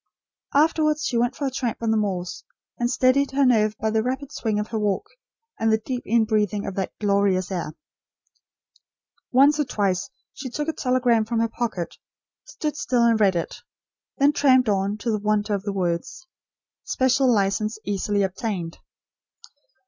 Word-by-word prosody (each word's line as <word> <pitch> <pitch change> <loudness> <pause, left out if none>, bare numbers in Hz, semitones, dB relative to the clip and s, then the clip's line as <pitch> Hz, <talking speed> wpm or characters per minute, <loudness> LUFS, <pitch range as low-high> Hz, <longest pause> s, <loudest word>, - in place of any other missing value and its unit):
Afterwards 305 0 +2
she 245 - -1
went 245 +2 0
for 285 - -3
a 270 - -1
tramp 245 -3 -2
on 225 - +1
the - - +2
moors, 185 -4 -2 0.4
and 240 0 +1
steadied 260 +2 +3
her 280 0 +3
nerve 215 -3 +3
by 220 - -1
the 220 0 +2
rapid 260 +4 -3
swing 215 -6 -1
of 210 - -3
her 225 - -2
walk, 205 -3 0 0.5
and 225 0 +2
the 220 - +4
deep 245 +3 -4
inbreathing 215 -3 +1
of 195 - -4
that 190 0 -3
glorious 200 -2 +1
air. 170 -4 -3 1.6
Once 280 +4 +5
or - - +3
twice 200 -7 -1 0.2
she 265 - -7
took 295 +5 -4
a 320 - 0
telegram 250 -4 +2
from 225 +1 -2
her 230 - +2
pocket, 220 -7 -4 0.5
stood 300 -2 -4
still 245 -4 +1
and 230 -1 +3
read 195 -3 +4
it; 170 - -4 0.6
then 285 +1 +4
tramped 260 -5 +4
on, 200 +1 0
to 230 +2 -2
the 215 - 0
wonder 210 0 0
of 200 - -1
the 205 +1 -3
words: 180 - -3 0.6
"Special 260 0 +2
license 210 +1 0
easily 205 0 0
obtained." 190 -3 -3
220 Hz, 170 wpm, -24 LUFS, 200-255 Hz, 1.6 s, Once